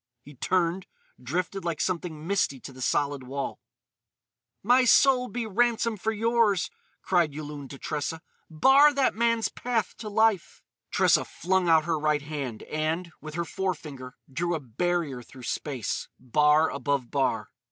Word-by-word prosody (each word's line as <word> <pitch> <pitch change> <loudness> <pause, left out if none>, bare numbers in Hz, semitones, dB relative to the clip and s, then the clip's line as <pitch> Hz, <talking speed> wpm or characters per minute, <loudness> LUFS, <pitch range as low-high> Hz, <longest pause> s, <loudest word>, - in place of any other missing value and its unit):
He 145 - -13
turned, 175 +6 0 0.3
drifted 180 +9 -3
like 170 -2 -2
something 165 -3 -2
misty 180 -8 0
to 135 - -9
the 130 - -11
solid 145 +2 0
wall. 135 +2 -5 1.0
"My 250 +5 +5
soul 250 0 +5
be 245 -1 -4
ransom 230 +1 +1
for 215 +2 -1
yours!" 225 -3 +2 0.3
cried 170 -6 +2
Yulun 145 -2 -7
to 140 - -9
Tressa. 155 +3 -4 0.3
"Bar 270 - +6
that 275 -2 +2
man's 230 0 +1
path 235 -5 -2
to 215 - -6
life!" 215 -3 +1 0.3
Tressa - - +3
flung 185 +1 0
out 160 -1 +5
her 165 -2 0
right 150 -1 +1
hand 140 -7 -5
and, 160 +3 -2
with 155 0 -8
her 170 0 -1
forefinger, 150 -9 -4 0.2
drew 175 +4 0
a - - -2
barrier 145 +1 -2
through 130 +2 -14
space, 130 -3 -3
bar 150 +5 +3
above 140 -4 -2
bar. 135 -2 0
165 Hz, 150 wpm, -27 LUFS, 145-205 Hz, 1.0 s, Bar